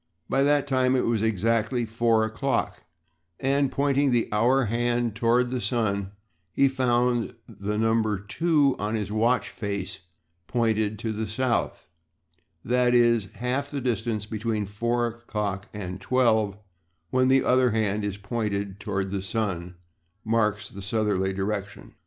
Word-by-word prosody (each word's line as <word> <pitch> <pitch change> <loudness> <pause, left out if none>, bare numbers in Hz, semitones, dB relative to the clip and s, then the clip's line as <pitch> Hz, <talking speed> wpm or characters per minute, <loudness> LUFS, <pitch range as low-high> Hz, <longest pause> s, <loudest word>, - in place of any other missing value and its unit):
By 135 - +1
that 145 0 +3
time 130 -2 +2
it 125 - +1
was 115 -2 +1
exactly 110 +3 +1
four 115 0 +2
o'clock, 110 +5 -2 0.5
and, 140 0 +1
pointing 140 0 +2
the 120 -2 +1
hour 125 +5 +3
hand 120 +1 0
toward 120 +2 +2
the 125 -1 -2
sun, 100 -6 -1 0.4
he 135 - +4
found 125 -3 +1
that 110 - -15
the 105 +1 -1
number 110 -1 +2
2 140 - +1
on 105 +2 -1
his 105 -2 -3
watch 115 +4 +1
face 100 -3 -4 0.5
pointed 110 -3 0
to 110 +2 -3
the 110 +1 -3
South: 120 +3 -1 0.8
that 125 0 +3
is, 120 -3 +4
half 130 +4 -2
the 145 - -3
distance 115 -4 -1
between 110 0 -2
four 120 +4 -1
o'clock 105 -4 -4
and 95 -2 -6
twelve 110 -4 +2 0.5
when 130 0 +3
the 135 0 +4
other 125 0 +4
hand 105 -2 0
is 100 -1 -3
pointed 100 -2 -3
toward 100 -2 -2
the 100 -1 -2
sun, 95 -4 -3 0.5
marks 110 -2 +1
the 100 - -10
southerly 100 -2 0
direction. 100 +1 -4
115 Hz, 145 wpm, -26 LUFS, 105-125 Hz, 0.8 s, he